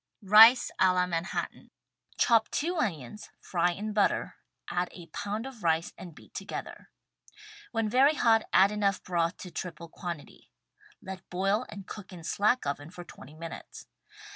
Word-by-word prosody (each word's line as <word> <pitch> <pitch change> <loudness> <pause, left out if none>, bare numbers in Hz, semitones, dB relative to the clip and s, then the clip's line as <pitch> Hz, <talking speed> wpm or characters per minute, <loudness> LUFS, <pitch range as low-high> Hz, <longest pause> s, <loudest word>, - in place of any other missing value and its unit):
RICE 220 +5 +8
A 185 -1 +5
LA 180 0 +2
MANHATTAN 170 0 -4 0.5
Chop 230 -2 +4
two 345 +4 -1
onions 175 - -3
— - - -48
fry 175 -1 +3
in 210 +5 -4
butter, 205 -1 +1 0.3
add 180 0 -1
a 175 - -10
pound 210 +3 -3
of 265 -5 -9
rice 165 0 +1
and 170 -4 -11
beat - - -17
together. - - -7 0.8
When 225 -1 0
very 265 +7 +4
hot, 225 -5 +3
add 195 +2 +5
enough 200 -2 0
broth 170 -1 -1
to 180 - -9
triple 170 -2 -7
quantity 170 -3 -8 0.3
— 420 -4 -27
let 190 -1 -9
boil 195 +6 0
and 200 -2 -9
cook 205 -2 -9
in 175 -3 -10
slack 210 +9 +1
oven 145 +2 -4
for 175 0 -10
20 150 -3 -14
minutes. 165 +1 -9
190 Hz, 165 wpm, -29 LUFS, 170-220 Hz, 0.8 s, RICE